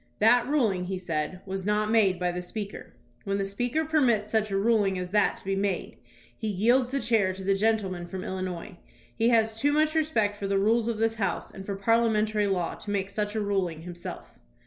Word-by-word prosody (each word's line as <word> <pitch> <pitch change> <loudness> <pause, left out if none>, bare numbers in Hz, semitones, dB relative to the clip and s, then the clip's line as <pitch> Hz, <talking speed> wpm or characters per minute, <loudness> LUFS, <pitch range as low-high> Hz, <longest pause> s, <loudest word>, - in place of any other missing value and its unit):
"That 240 +3 +4
ruling," 220 -11 +1
he 190 +1 -3
said, 175 0 -3
"was 190 0 -4
not 210 +2 +1
made 200 -5 +4
by 180 -1 0
the 180 0 -4
Speaker. 200 +2 -7 0.3
When 200 0 -1
the 195 - -1
Speaker 245 +10 -1
permits 245 -9 +2
such 220 -1 +1
a 195 - 0
ruling 205 -2 +2
as 180 0 -5
that 210 0 +2
to - - -15
be 195 0 0
made, 195 -2 -2 0.4
he 220 -2 -3
jdelds 245 +5 +3
the 275 +1 -1
chair 220 -7 +2
to 190 +1 -8
the 195 +1 +2
gentleman 195 -4 0
from 185 +1 -6
Il 190 - -4
linois. 180 -1 -5 0.4
He 230 - +2
has 225 -2 +3
too 290 +2 +3
much 305 +1 +2
respect 230 -11 +1
for 200 - -3
the 195 0 +1
rules 225 +3 +2
of 230 -2 -1
this 225 +1 +1
House 210 -4 -2
and 195 0 -10
for 200 - -2
parliamentary 215 0 +2
law 180 -3 -1
to - - -9
make 200 -1 -1
such 210 +1 -2
a 215 - 0
ruling 190 -6 -1
himself." 175 0 -8
205 Hz, 215 wpm, -27 LUFS, 190-225 Hz, 0.4 s, That